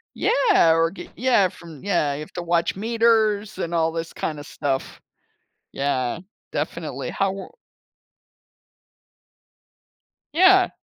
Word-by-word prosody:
Yeah, 420 Hz, -, +4 dB
or, 165 Hz, 0 st, +2 dB
g 195 Hz, -, -10 dB
yeah, 235 Hz, -7 st, +3 dB
from, 165 Hz, -5 st, -13 dB
yeah, 170 Hz, -7 st, +1 dB
you 145 Hz, -, -5 dB
have 155 Hz, -, -9 dB
to 175 Hz, -, -4 dB
watch 170 Hz, +1 st, 0 dB
meters 220 Hz, -2 st, +2 dB
and 170 Hz, -2 st, -3 dB
all 165 Hz, -1 st, +2 dB
this 165 Hz, 0 st, -4 dB
kinda 150 Hz, -2 st, -4 dB
stuff. 135 Hz, -3 st, -3 dB, 0.7 s
Yeah, 135 Hz, 0 st, -1 dB, 0.3 s
definitely. -, -, -4 dB
How 195 Hz, 0 st, 0 dB
w 195 Hz, 0 st, -6 dB, 2.8 s
Yeah. 375 Hz, +3 st, +6 dB
175 Hz, 115 wpm, -23 LUFS, 160-220 Hz, 2.8 s, Yeah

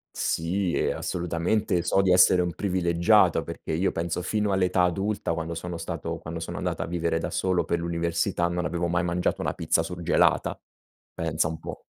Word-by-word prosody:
Sì, 85 Hz, +2 st, -1 dB
e -, -, +1 dB
assolutamente, 90 Hz, +2 st, -1 dB
so 90 Hz, +3 st, +3 dB
di 95 Hz, -1 st, +2 dB
essere 90 Hz, 0 st, +6 dB
un 90 Hz, -1 st, -1 dB
privilegiato, 85 Hz, -3 st, +3 dB
perché -, -, -7 dB
io 85 Hz, +5 st, +1 dB
penso 85 Hz, +1 st, -2 dB
fino 105 Hz, +2 st, 0 dB
all'età 90 Hz, -1 st, +2 dB
adulta, 95 Hz, +1 st, 0 dB
quando 80 Hz, 0 st, -4 dB
sono 85 Hz, +1 st, -5 dB
stato -, -, -4 dB
quando 80 Hz, 0 st, -6 dB
sono -, -, -5 dB
andato -, -, -2 dB
a -, -, -1 dB
vivere 85 Hz, -1 st, -1 dB
da 80 Hz, -, -3 dB
solo, 95 Hz, -1 st, +1 dB
per 85 Hz, -, -1 dB
l'università, 85 Hz, +1 st, -1 dB
non 90 Hz, 0 st, -2 dB
avevo 85 Hz, 0 st, -1 dB
mai 85 Hz, 0 st, +1 dB
mangiato 90 Hz, +1 st, 0 dB
una -, -, -1 dB
pizza 80 Hz, -, +1 dB
surgelata. 85 Hz, 0 st, +1 dB, 0.5 s
Pensa 80 Hz, 0 st, 0 dB
un 80 Hz, -1 st, -5 dB
po'. -, -, -8 dB
85 Hz, 180 wpm, -26 LUFS, 85-90 Hz, 0.5 s, essere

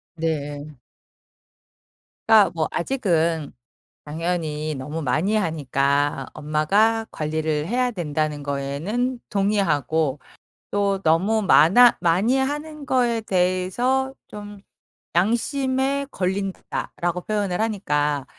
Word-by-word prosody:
네. 150 Hz, -2 st, -4 dB, 1.5 s
그러니까 215 Hz, -5 st, +6 dB
뭐 160 Hz, -2 st, -1 dB
아직은 170 Hz, -, 0 dB, 0.5 s
당연히 155 Hz, -1 st, -3 dB
너무 150 Hz, +5 st, -5 dB
많이 155 Hz, +11 st, 0 dB
하니까 145 Hz, -5 st, 0 dB
엄마가 195 Hz, +10 st, +1 dB
관리를 155 Hz, 0 st, -2 dB
해야 250 Hz, +2 st, 0 dB
된다는 155 Hz, -5 st, -2 dB
거에는 155 Hz, -, -2 dB
동의하고 160 Hz, -, 0 dB, 0.5 s
또 200 Hz, -1 st, 0 dB
너무 190 Hz, +8 st, +2 dB
많아 205 Hz, +6 st, +6 dB
많이 190 Hz, +10 st, +2 dB
하는 295 Hz, +2 st, -3 dB
거에 240 Hz, -3 st, +1 dB
대해서 195 Hz, +8 st, 0 dB
좀 205 Hz, -1 st, -10 dB, 0.5 s
'양심에 265 Hz, +7 st, 0 dB
걸린다.'라고 185 Hz, -2 st, -3 dB
표현을 205 Hz, -3 st, -2 dB
하니까 150 Hz, -10 st, 0 dB
180 Hz, 215 characters per minute, -23 LUFS, 155-220 Hz, 1.5 s, 그러니까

